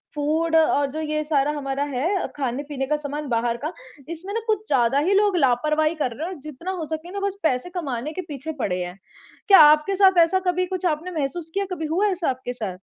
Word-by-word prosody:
Food 315 +3 0
और 290 -3 +3
जो 310 +3 -4
ये 305 0 -1
सारा 295 -2 +1
हमारा 275 0 -2
है 345 +10 0
खाने-पीने 275 +1 -3
का 300 - +1
सामान 295 0 -5
बाहर 235 0 0
का। 310 +4 -3 0.4
इसमें 340 +4 -6
ना 455 - 0
कुछ 430 -1 0
ज़्यादा 265 0 +3
ही 395 - +3
लोग 400 -2 +3
लापरवाही 305 +3 +2
कर 295 -6 -1
रहे 315 +6 -4
हैं 375 - -5
और 345 - -11
जितना 305 +6 -6
हो 340 -4 -4
सके 315 +3 -6
ना 400 - -4
बस 400 0 -6
पैसे 265 +1 0
कमाने 275 -2 -4
के 370 - -4
पीछे 295 +1 -5
पड़े 180 -6 -1
हैं। 180 +1 -7 0.5
क्या 395 -2 +8
आपके 305 +5 +6
साथ 380 -2 +5
ऐसा 375 +3 +2
कभी 360 +1 +1
कुछ 370 0 -4
आपने 330 +2 -1
महसूस 310 +4 -3
किया? 395 0 0
कभी 320 -3 -3
हुआ 355 +7 +1
ऐसा 360 -6 0
आपके 255 -1 -4
साथ? 210 -7 -5
305 Hz, 225 wpm, -23 LUFS, 275-360 Hz, 0.5 s, क्या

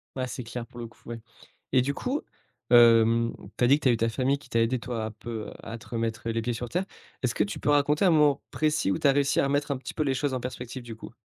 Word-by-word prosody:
Ouais, 130 -1 -2
c'est 125 0 -6
clair, 115 +1 -6
pour 120 0 -13
le 115 - -5
coup, - - -21
ouais. 120 0 -5 0.5
Et 130 - +5
du 140 +3 -1
coup, 265 - -2 0.5
hem, 115 -1 +6 0.2
tu - - 0
as 120 - +6
dit 140 +3 +5
que - - -17
tu 130 - +4
as - - +6
eu 120 - +1
ta 115 +1 +1
famille 130 +4 +1
qui - - -18
t'a 115 - +2
aidé, 120 +3 +1
toi, 115 -2 -4
un 110 - -5
peu 110 0 -7
à 115 +1 -6
te - - -15
remettre, 115 0 -3
heu, 115 - +1
les 115 - -1
pieds 120 +2 -2
sur 120 +1 -5
terre. 180 +7 -1 0.4
Est - - +3
ce 120 - -3
que - - +3
tu 105 - -5
peux - - -1
raconter 145 +4 +3
un - - +6
moment 150 -2 +4
précis 155 -9 +1
où 95 - 0
tu - - +3
as 140 - +6
réussi 140 0 +2
à - - +3
remettre 145 +1 0
un 140 - -1
petit 130 - -8
peu 155 - 0
les 135 -3 +1
choses 140 +1 -1
en 130 - -1
perspective, 125 0 -6
du 115 -2 -8
coup? 110 - -10
125 Hz, 310 wpm, -27 LUFS, 115-140 Hz, 0.5 s, hem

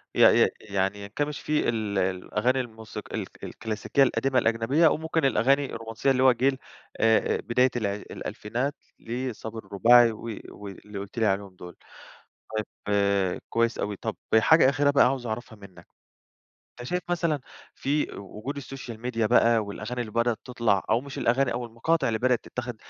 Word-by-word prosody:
ي - - +2 0.2
ي - - +4
يعني 100 -1 -1
ينكمش 145 +8 -3
في 150 0 0
ال 110 -3 -2
الأغاني 100 +7 0
الموسيق 110 -3 -7
الك - - -6
الكلاسيكية 110 +5 0
القديمة 130 +1 +2
الأجنبية، 115 +8 +3
أو 150 - +2
ممكن 160 -1 -1
الأغاني 135 +2 +3
الرومانسيّة 115 +4 -1
اللي 130 -1 +2
هو 130 - +7
جيل 130 +3 +1 0.4
آآ 110 0 +3
بداية 125 +3 +2
الع 105 -4 0
الألفينات 120 +6 -4 0.2
لصابر 115 -2 -5
الرباعي 120 +4 +6
و 110 - -10 0.3
واللي 100 0 -9
قلت 100 +3 -9
لي 110 - +3
عليهم 100 -2 -1
دول. 90 -1 -11 1.1
طيّب 100 -2 +1
كويّس 115 0 +1
أوي. 105 - -2
طب - - -4 0.2
حاجة 160 +3 +6
أخيرة 145 +1 +2
بقى 140 - +5
عاوز 130 -1 0
أعرفها 110 +1 -5
منّك؛ 100 -3 -14 1.0
أنت 120 - -6
شايف 180 0 -1
مثلًا 170 -4 0 0.3
في 145 +2 0
و 100 +1 -10
وجود 140 +6 -5
Social 130 -4 -8
Media 115 -2 0
بقى 115 0 +4
والأغاني 105 +3 -4
اللي 110 -3 -5
بدأت 115 0 +1
تطلع، 115 -6 +1
أو 115 +2 +3
مش 140 +1 -8
الأغاني 130 +3 +2
أو 120 0 -3
المقاطع 120 +8 0
اللي 110 -1 0
بدأت 125 0 +2
تتاخد 125 -1 -5
115 Hz, 165 wpm, -26 LUFS, 105-130 Hz, 1.1 s, هو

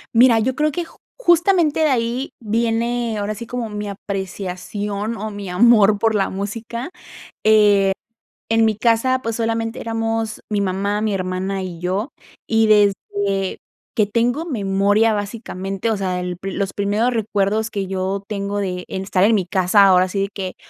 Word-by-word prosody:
Mira, 235 -1 +6
yo 250 +4 +1
creo 300 +1 +1
que 345 +3 -3
j - - -18 0.2
justamente 345 -6 +3
de 310 - +4
ahí 245 +1 -1
viene 230 +1 -1
ahora 205 +1 -2
sí 230 +2 -8
como 245 -2 -3
mi 210 0 -5
apreciación 200 +2 -4
o 215 +1 -4
mi 200 -2 -7
amor 210 +1 +5
por 225 +1 +1
la 195 -2 +1
música, 230 - -5 0.5
eh, 205 -2 +5 0.6
en 225 0 +4
mi 220 - +2
casa, 245 +3 +2
pues 230 0 -2
solamente 225 0 -2
éramos 225 -1 -2
mi 210 -1 0
mamá, 200 +2 -1
mi 215 -2 0
hermana 190 +1 -2
y 175 -3 -7
yo, 190 +8 -2 0.4
y 225 -1 +2
desde 200 -2 +1 0.4
que 210 -2 +2
tengo 240 +9 0
memoria, 205 - +2
básicamente, 200 -1 -3
o 215 - 0
sea, 185 -2 -2
el 180 -1 -4
pri 195 0 -5
los 195 0 -2
primeros 210 +5 0
recuerdos 215 0 0
que 200 -3 -3
yo 190 +1 -2
tengo 200 -1 -3
de 180 -3 -3
en 190 - -4
estar 190 -1 +1
en 220 +2 +5
mi 190 -4 0
casa, 185 +2 +4
ahora 185 -1 +5
sí 195 +1 -2
que 185 -2 -5
210 Hz, 170 wpm, -20 LUFS, 195-230 Hz, 0.6 s, Mira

